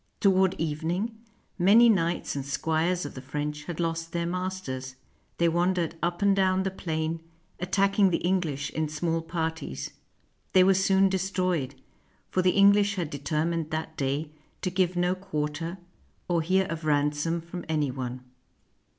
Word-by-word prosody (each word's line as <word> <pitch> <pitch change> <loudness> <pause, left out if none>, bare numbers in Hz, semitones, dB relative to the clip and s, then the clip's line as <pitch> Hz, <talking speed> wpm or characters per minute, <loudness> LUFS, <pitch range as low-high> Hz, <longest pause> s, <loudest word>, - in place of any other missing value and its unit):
Toward 190 -1 +4
evening, 165 +8 -2 0.4
many 210 +7 +7
knights 175 -9 +1
and 140 - -2
squires 160 +5 0
of 145 - -6
the 130 - -8
French 150 +2 -4
had 175 -1 -6
lost 165 -1 -2
their 170 -1 0
masters: 175 -8 -4 0.4
they 170 - +3
wandered 175 0 +1
up 175 +3 -1
and 200 -1 +4
down 190 -1 +2
the 190 - -1
plain, 160 -3 -3 0.4
attacking 195 +2 +3
the 175 - +1
EngUsh 165 -6 0
in 155 -1 -1
small 165 +2 -1
par 165 0 -1
ties: 160 -3 -7 0.6
they 185 - +7
were 195 +1 +5
soon 190 +1 +4
destroyed; 185 -7 -1 0.6
for 185 - +2
the 185 - +4
English 200 +1 +5
had 170 -5 -3
de 145 - -5
termined 155 +2 -1
that 160 0 -4
day 145 +2 -2 0.3
to 185 - 0
give 185 -1 +1
no 175 +1 +2
quarter 165 -2 -3 0.5
or 170 -2 +2
hear 190 +4 +2
of 165 -2 -5
ransom 150 +2 +1
from 170 +2 -7
any 150 -4 +1
one. 125 -1 -5
170 Hz, 160 wpm, -27 LUFS, 155-185 Hz, 0.6 s, many